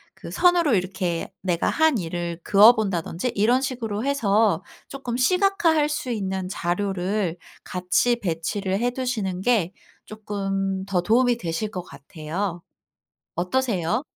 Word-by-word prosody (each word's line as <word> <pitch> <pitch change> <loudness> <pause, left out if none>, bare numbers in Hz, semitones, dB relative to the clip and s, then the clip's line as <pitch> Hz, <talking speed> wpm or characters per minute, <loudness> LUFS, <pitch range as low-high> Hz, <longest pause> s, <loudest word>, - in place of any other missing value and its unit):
그 - - -10
선으로 345 -7 +3
이렇게 185 -2 -2
내가 175 -3 0
한 315 -5 +3
일을 170 -2 -4
그어 210 +4 +7
본다든지 195 +1 -2
이런 235 +6 +3
식으로 230 -5 -3
해서 220 -7 +2 0.3
쪼끔 255 -3 -4
시각화할 345 0 +3
수 295 -4 -3
있는 190 -4 -2
자료를 185 0 -1 0.3
같이 180 +7 +1
배치를 190 +2 -2
해 245 +2 +1
두시는 225 -8 -2
게 195 -6 +1 0.3
쪼끔 195 -2 -3
더 190 -3 0
도움이 240 +5 +3
되실 175 +2 -3
것 185 - -4
같아요. 170 +4 -5 0.7
어떠세요? 185 - 0
200 Hz, 265 characters per minute, -24 LUFS, 180-245 Hz, 0.7 s, 그어